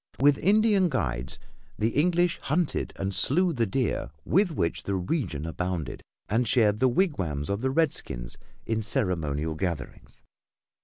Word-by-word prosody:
With 140 +1 +4
Indian 205 -1 +4
guides, 70 - -2 0.4
the 110 - +1
English 175 +6 +2
hunted 160 +3 -1
and 95 0 -3
slew 180 - +2
the 115 -5 0
deer 125 +4 -1 0.2
with 195 +1 +3
which 85 - -1
the 100 - -2
region 90 - -2
abounded 90 -1 -3 0.3
and 115 +5 +1
shared 105 -4 +3
the 130 - +4
wigwams 95 - 0
of 100 +2 -2
the 130 - +1
redskins 135 - -1 0.3
in 110 -1 -1
ceremonial 85 - -1
gatherings. 80 -3 -5
110 Hz, 140 wpm, -27 LUFS, -, 0.4 s, With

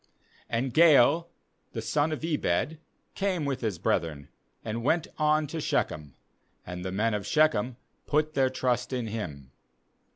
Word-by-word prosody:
26And 120 +2 -1
Gaal 165 +1 +6 0.5
the - - -3
son 150 +1 +1
of 155 +1 -3
Ebed 150 - 0 0.3
came 190 -6 -1
with 140 -2 -2
his 110 -7 -1
brethren, 75 -4 -1 0.4
and 115 +1 -3
went 160 +5 +2
on 155 0 +3
to 160 +2 -5
Shechem; 75 - -1 0.5
and 90 0 -6
the 95 - -3
men 110 +4 +1
of 105 -1 -3
Shechem 130 -6 +2 0.3
put 155 +1 +1
their 135 -2 +3
trust 125 -1 -1
in 125 -2 -1
him. 80 - -6
130 Hz, 150 wpm, -28 LUFS, 105-155 Hz, 0.5 s, Gaal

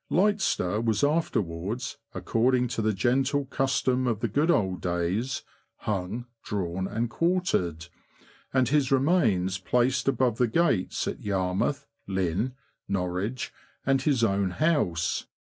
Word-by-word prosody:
Litester 180 - +1
was 110 0 +1
afterwards, 115 - -1 0.2
according 125 +2 +2
to 115 - -2
the 110 0 +2
gentle 130 +8 +1
custom 130 -1 +1
of 115 -4 0
the 115 - 0
good 145 - +1
old 95 - +2
days, 90 +9 -1 0.3
hung, 105 +3 -3 0.2
drawn, 95 -2 -2
and 115 +4 -1
quartered, 120 - 0 0.7
and 130 -3 +2
his 145 -2 +2
remains 115 - +2
placed 125 +7 +1
above 125 -4 +2
the 125 - +4
gates 115 - +1
at - - -4
Yarmouth, 95 +8 -1 0.2
Lynn, 95 +6 -1 0.3
Norwich, 95 +5 -2 0.3
and 135 0 +3
his 135 -4 +2
own 100 -3 +2
house. 90 - 0
115 Hz, 125 wpm, -27 LUFS, 95-135 Hz, 0.7 s, the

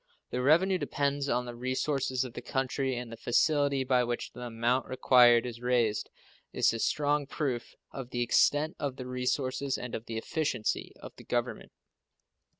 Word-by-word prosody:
The 125 - -1
revenue 175 +7 +4
depends 140 -2 -1
on 125 +1 0
the 120 - -6
resources 130 +1 -1
of 125 -3 -7
the 120 - -6
country, 130 +1 -1
and 120 -1 -6
the - - -6
facility 140 +2 +2
by 125 -1 +2
which 120 0 -3
the 125 - -11
amount 120 +2 0
required 125 -2 +5
is 120 -1 -6
raised 120 -4 +1 0.4
is - - +2
a 115 - -3
strong 145 +2 +1
proof 135 -5 -3 0.2
of 130 -3 -7
the 120 -1 -1
extent 145 +6 +2
of 140 -3 -2
the 130 - -7
resources 130 +2 -1
and 125 - -7
of 115 - -5
the 115 - -4
efficiency 125 -3 -2
of - - -10
the - - -12
Government. - - -3
130 Hz, 170 wpm, -30 LUFS, 120-140 Hz, 0.4 s, required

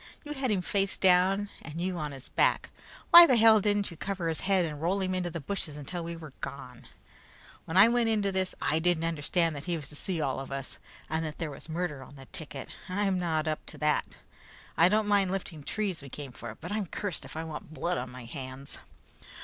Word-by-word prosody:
You 295 -1 -5
had 265 -3 -1
him 195 -4 +1
face 195 0 0
down 190 +2 +4
and 160 +1 -7
you 185 +1 -1
on 150 -1 -3
his 135 -1 -10
back; - - +2 0.4
why 345 0 +12
the 255 - +5
hell 220 -2 +7
didn't 205 -1 +1
you 170 - -10
cover 190 -3 -2
his 160 - -1
head 190 -2 +2
and 150 -2 -5
roll 180 +4 +1
him 185 -1 -1
into 180 -1 -1
the 170 0 -5
bushes 155 -1 -4
until 170 +4 -5
we 170 0 -5
were 155 -4 -10
gone? - - -7 0.8
When 160 - -2
I 200 +3 +9
went 235 -1 +2
into 205 -3 +1
this, 190 -1 -1
I 155 - +1
didn't 170 -1 +2
understand 165 0 0
that 145 - -7
he 175 -1 -1
was 150 -4 -6
to 150 - -11
see 175 +3 -2
all 135 -4 -1
of 135 0 -7
us 135 -1 -5 0.3
and 160 +1 -1
that 155 -1 -5
there 160 -3 -3
was 140 - -10
murder 160 -4 -2
on 135 - -12
the 135 -1 -11
ticket. 140 -1 -6 0.2
I'm 195 0 +1
not 160 -3 0
up 155 -1 -2
to - - -8
it. 150 0 0 0.6
I 170 +2 +6
don't 215 +1 +2
mind 200 -2 +3
lifting 180 -5 -4
trees 195 +2 -2
we 140 - -10
came 140 0 -7
for, 115 -2 -8
but - - -8
I'm 210 -2 -1
cursed 200 0 -4
if - - -9
I 160 - -2
want 160 -1 -7
blood 175 +2 0
on 125 0 -5
my 125 -1 -9
hands." 130 +2 -7
170 Hz, 230 wpm, -29 LUFS, 150-195 Hz, 0.8 s, why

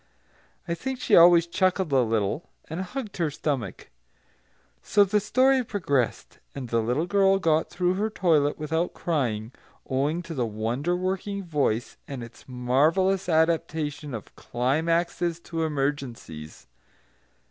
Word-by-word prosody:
I 170 - -1
think 260 +8 -4
she 230 - +3
always 170 0 +7
chuckled 185 -1 0
a 130 - +5
little, 110 +5 -1 0.2
and 160 +4 -4
hugged 215 +3 -6
her 165 -3 +1
stomach. 140 -8 -4 0.9
So 205 - +4
the 205 +2 +2
story 255 +5 +3
progressed, 145 - -2 0.2
and 130 -4 -6
the 115 0 +2
little 125 +8 0
girl 195 +1 +3
got 160 -4 +1
through 180 0 0
her 210 +4 -1
toilet 155 -8 +2
without 160 +3 -2
crying, 120 -9 -1 0.4
owing 145 +6 0
to 170 - -7
the 125 -6 -1
wonder 115 +10 -1
working 190 +2 -2
voice 140 -9 -1
and 135 -4 -6
its 115 0 -13
marvellous 155 +10 +2
adaptation 160 -3 0
of 110 - -9
climaxes 165 +6 0
to 165 -1 -4
emergencies. 135 - -4
160 Hz, 135 wpm, -26 LUFS, 130-180 Hz, 0.9 s, always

